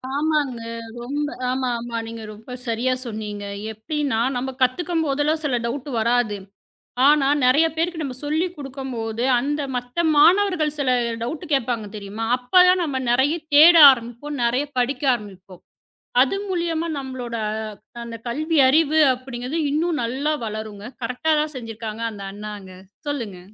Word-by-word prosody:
ஆமாங்க. 295 -5 0 0.4
ரொம்ப 290 +3 -2 0.2
ஆமா, 255 -1 -1
ஆமா. 235 0 -5
நீங்க 225 -1 -7
ரொம்ப 220 +4 -13 0.2
சரியா 240 +3 0
சொன்னீங்க. 210 -2 -5 0.3
எப்பிடின்னா 275 +2 -2 0.2
நம்ம 255 +2 -2
கத்துக்கம்போதுலாம் 310 +1 +1
சில 255 -4 +1
டவுட் 270 +4 -4
வராது. 235 -2 +1 0.7
ஆனா 295 -2 +4 0.2
நிறைய 290 +6 +5
பேருக்கு 330 +1 -1
நம்ம 265 -3 -4
சொல்லிக் 330 +4 -1
கொடுக்கும் 270 -2 -7
போது, 225 +1 -3 0.2
அந்த 290 +3 -2 0.2
மத்த 245 +7 -2
மாணவர்கள் 340 -2 +4
சில 275 - 0 0.3
டவுட் 295 +9 -4
கேப்பாங்க 235 -5 0
தெரியுமா? 205 +2 -5
அப்ப 250 +8 -16
தான் 365 0 +4
நாம 280 -5 -2
நிறைய 265 +6 +3 0.2
தேட 325 +4 +9 0.2
ஆரம்பிப்போம். 245 +4 -3
நிறைய 250 +5 +1
படிக்க 250 +3 0
ஆரம்பிப்போம். 190 -4 -10 0.6
அது 270 +8 +2
மூலியமா 335 -2 -1
நம்மளோட 255 -3 -6 0.7
அந்த 235 -1 -7
கல்வி 310 +6 -1
அறிவு 310 +2 +3
அப்பிடிங்குது 255 +3 -5
இன்னும் 320 0 0
நல்லா 270 +6 -1
வளருங்க. 215 -1 -6 0.2
கரெக்டா 250 +7 -1
தான் 305 0 -3
செஞ்சிருக்காங்க 225 -2 -6
அந்த 200 -2 -9
அண்ணாங்க. 205 -2 -8 0.4
சொல்லுங்க. 230 -11 -4
260 Hz, 135 wpm, -22 LUFS, 230-300 Hz, 0.7 s, தேட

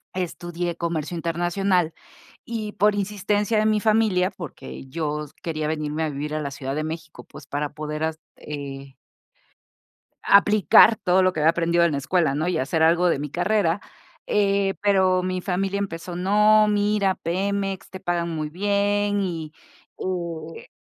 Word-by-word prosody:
estudié 175 -1 -3
comercio 170 -1 -3
internacional, 175 +1 0 0.5
y 220 -3 -4
por 205 +2 +3
insistencia 205 +2 0
de 215 - +1
mi 215 -1 +2
familia, 210 -4 +2
porque 165 -5 -9
yo 150 +1 -3
s 145 - -18
quería 155 -2 -2
venirme 155 0 -2
a 155 - -1
vivir 150 +2 -4
a 155 - -1
la 140 -1 -4
Ciudad 135 0 -5
de 155 - -1
México, 160 0 -7
pues - - -13
para 145 +1 -2
poder 150 0 -4
as 160 0 -2 0.2
eh 140 -2 -8 1.3
aplicar 210 +2 +6
todo 190 -3 +2
lo 185 0 +3
que 160 - -3
había 155 +2 +5
aprendido 170 +1 +2
en 165 - +2
la 140 - -1
escuela, 140 +1 +1
¿no?, 155 +4 -1
y 180 - 0
hacer 160 +5 0
algo 170 +2 +4
de 170 - +1
mi 145 0 -5
carrera, 180 +1 +1 0.5
eh, 200 -1 +1
pero 190 -2 +3
mi 185 0 -2
familia 195 +2 -1
empezó: 175 -3 -5
"No, 210 +3 +4
mira, 205 -2 +2
Pemex, 195 +2 -2
te 190 - -8
pagan 170 -1 -1
muy 155 -2 -3
bien". 205 +2 +1
Y, 165 -5 -4 1.0
eh, - - -11
175 Hz, 160 wpm, -23 LUFS, 155-200 Hz, 1.3 s, aplicar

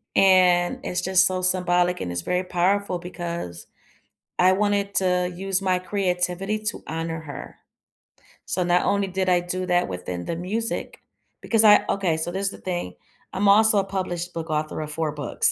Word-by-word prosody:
And 180 -2 +4
it's 180 - -2
just 185 0 +4
so 185 -1 0
symbolic, 180 -1 +1
and 90 - -3
it's 85 - -2
very 180 - -1
powerful 185 +1 0
because 170 - -6 0.7
I 185 +1 +5
wanted 200 0 0
to 180 -1 +1
use 195 +1 -1
my 185 -1 +1
creativity 185 +1 -1
to 210 - -2
honor 165 +1 -4
her. 145 -3 -9 0.9
So, 180 - -1
not 175 0 +2
only 200 -1 +1
did 190 0 -2
I 180 -1 +3
do 185 +1 -3
that 180 - +1
within 90 -1 -5
the 165 - -4
music 220 +6 -4 0.4
because 225 -1 +2
I 210 -1 +7
okay, 185 -5 +1
so 160 +2 -3
this 195 +2 -3
is 195 - +1
the - - -11
thing: 175 - -4 0.4
I'm 200 +1 +2
also 215 0 +5
a - - +1
published 180 -2 -4
book 165 -1 -5
author 155 0 -2
of 155 0 -5
4 155 0 -2
books. 145 -4 0
180 Hz, 180 wpm, -24 LUFS, 170-195 Hz, 0.9 s, I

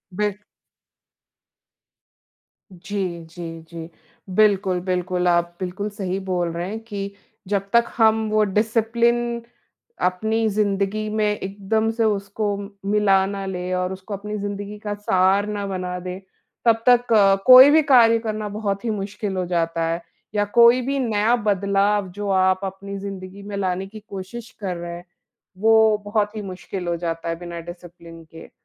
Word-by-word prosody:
बिल्क 205 0 -1 2.3
जी, 180 -2 -4
जी, 165 0 -8
जी, 165 -1 -8 0.5
बिल्कुल, 195 -3 +3
बिल्कुल। 180 -1 -1
आप 175 0 +1
बिल्कुल 190 +3 -4
सही 195 -2 -3
बोल 175 -2 0
रहे 175 +2 -3
हैं 220 - -4
कि 200 -3 -5 0.3
जब 195 0 -1
तक 235 0 +5
हम 220 -1 +3
वो 215 0 +3
डिसिप्लिन 235 +3 +1 0.7
अपनी 220 +5 0
ज़िंदगी 205 +1 0
में 215 0 0
एकदम 210 +2 -1
से 225 0 -1
उसको 205 0 -1
म 200 0 -7 0.2
मिला 195 -2 +4
ना 195 0 -4
लें 180 -1 -4
और 180 +1 -1
उसको 190 +2 -8
अपनी 210 +2 -5
ज़िंदगी 205 +1 -5
का 205 -1 -4
सार 195 0 +2
ना 205 -1 -3
बना 180 -1 -3
दें, 180 +1 -6 0.5
तब 225 0 +3
तक 245 -1 +4
अ, 195 -2 +6
कोई 255 +2 +10
भी 315 +1 +6
कार्य 230 -3 +6
करना 215 -1 -3
बहुत 205 0 -3
ही 230 - 0
मुश्किल 205 -1 -3
हो 180 - -1
जाता 165 -1 -1
है, 165 +1 -2 0.3
या 205 0 +2
कोई 235 +2 +7
भी 275 +2 -1
नया 225 -1 +2
बदलाव 200 -2 +1
जो 205 -1 -4
आप 185 -1 +3
अपनी 195 +1 -6
ज़िंदगी 195 0 -8
में 205 0 -6
लाने 190 0 -2
की 215 +2 -11
कोशिश 200 +4 -7
कर 185 -4 -3
रहे 170 0 -6
हैं, 175 +1 -11 0.5
वो 220 0 +5
बहुत 210 0 0
ही 215 - -4
मुश्किल 185 -1 -6
हो 170 - 0
जाता 165 -1 -4
है, 165 - -1
बिना 170 -1 -7
डिसिप्लिन 170 -1 -11
के। 165 - -11
200 Hz, 160 wpm, -22 LUFS, 185-215 Hz, 2.3 s, कोई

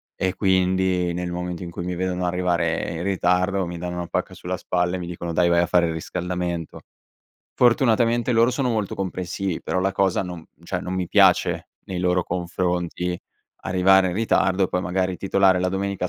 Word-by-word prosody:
e 95 -1 -1
quindi, 95 -2 +1
nel 90 +1 -3
momento 90 -1 -4
in 85 - -7
cui 85 - -6
mi 90 0 -3
vedono 90 0 -2
arrivare 85 -2 0
in 85 +1 -4
ritardo, 95 0 +1
mi 85 0 -6
danno 90 +1 -5
una 90 -1 -4
pacca - - -2
sulla - - -4
spalla 90 0 -1
e 90 - -3
mi 85 - -6
dicono: 85 -1 -5
"Dai 85 +1 +3
vai 85 0 +4
a 85 - +3
fare 85 0 +3
il - - -2
riscaldamento". 90 0 -4 0.8
Fortunatamente 120 0 +3
loro 115 +1 +4
sono 125 0 0
molto 110 -4 -1
comprensivi 95 -1 -3
però 95 - -1
la 95 +1 0
cosa 95 -1 +1
non 90 -3 -7 0.2
cioè 90 +1 -3
non 90 - -4
mi 90 -1 -1
piace - - +3 0.2
nei 95 - -5
loro 90 0 +2
confronti, 90 0 -2 0.5
arrivare 95 +1 +4
in 90 - -3
ritardo, 95 -3 +2
poi 90 - -1
magari 90 0 -1
titolare 95 -1 +3
la 90 - +1
domenica 95 -1 -2
90 Hz, 185 wpm, -23 LUFS, 90-95 Hz, 0.8 s, vai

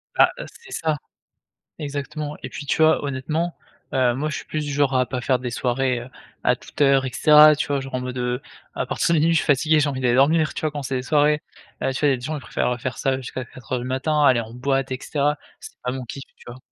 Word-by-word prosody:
Bah, - - +6
heu, - - -5 0.2
c'est - - -14
ça. 155 -2 0 0.8
Exactement, 145 +1 -4
et - - -5
puis, 145 - -8
tu 160 - +1
vois, 155 -2 +4
honnêtement, 155 +5 -2 0.4
heu, 125 -2 +2
moi 150 +4 -2
je - - -3
suis - - -8
plus 155 -1 -3
genre 140 -2 +1
à 125 -1 +2
pas 125 -2 -3
faire 130 +1 +1
des 125 0 -4
soirées, 125 +1 0
heu, 125 +2 -10 0.3
à - - +3
toute - - -14
heure 135 -2 +5
et - - -3
cetera, 150 +1 +7
tu 150 - -2
vois? 140 -1 0
Genre, 135 -1 -8
en 130 - 0
mode, 125 0 -5
heu, 125 0 -1 0.3
à - - -1
partir 170 - 0
de 155 - +3
minuit 165 +2 +3
je - - +3
suis - - -2
fatigué, 155 +2 +3
j'ai 145 -1 +2
envie 130 -2 -3
d'aller 125 -1 +2
dormir, 155 +3 +3
tu - - -5
vois? 155 -1 0
Quand 145 -1 -4
c'est 130 0 -2
des 125 - -2
soirées, 150 +2 +3 0.4
heu, 135 - +1
tu 130 - -4
vois, 150 - +3
les - - -11
gens 155 +5 -3
ils - - -6
préfèrent, 125 - -1
heu, 125 - -4
faire 120 0 -4
ça 135 -1 +1
jusqu'à 130 0 -6
4:00 125 +1 -5
du 120 - -5
matin, 145 +4 0
aller 130 -4 +5
en 115 0 -8
boîte 135 +2 -1
et 130 - -2
cetera. 145 0 0 0.2
C'est - - -12
pas 125 - -1
mon 130 -1 -5
kiff, 135 +3 -8
tu - - -19
vois? 125 - -10
135 Hz, 270 wpm, -23 LUFS, 125-150 Hz, 0.8 s, cetera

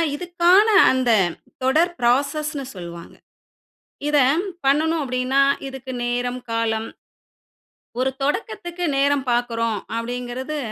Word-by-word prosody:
இதுக்கான 355 +5 +3 0.2
அந்த 255 -2 +1 0.5
தொடர் 320 +7 +3
பிராசஸ்ணு 280 +4 0
சொல்வாங்க. 170 -2 -9 0.9
இத 295 0 +2 0.5
பண்ணனும் 315 +3 +2
அப்டின்னா 255 +1 +1 0.3
இதுக்கு 265 -1 -8
நேரம், 245 +1 -2
காலம். 225 -1 -1 1.1
ஒரு 260 +1 +1
தொடக்கத்துக்கு 350 - -3
நேரம் 280 0 +2
பார்க்குறோம் 230 -2 0 0.2
அப்டிங்குறது 245 +5 -4
265 Hz, 90 wpm, -22 LUFS, 245-305 Hz, 1.1 s, இதுக்கான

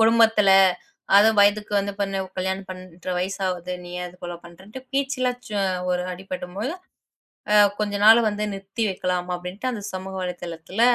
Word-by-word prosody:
குடும்பத்துல 225 -2 +5 0.7
அது 210 +2 +7
வயதுக்கு 205 +1 +3
வந்து 200 0 -2
பெண்ணா 195 -1 -1 0.2
கல்யாணம் 190 +1 -2
பண்ற 185 -1 -10
வயசு 190 +3 -2
ஆகுது. 180 -1 -3
நீ 175 - -10
ஏன் 180 - -3
இத 180 - -16
போலப் 175 0 -7
பண்றன்ட்டு 190 +9 -11
பேச்சுல 270 -2 0 0.2
சோ 210 -1 -2 0.3
ஒரு 180 0 0
அடிபடும்போது 190 - -5 0.8
ஆ - - +6 0.2
கொஞ்ச 205 -1 -1
நாள் 225 +2 +9
வந்து 210 0 -2
நிறுத்தி 195 +3 -4
வைக்கலாம் 180 -1 -2
அப்புடின்னுட்டு 180 +7 -4
அந்தச் 210 -4 -5
சமூக 190 +1 -6
வலைத்தளத்துல 175 +2 -5
195 Hz, 155 wpm, -23 LUFS, 180-210 Hz, 0.8 s, நாள்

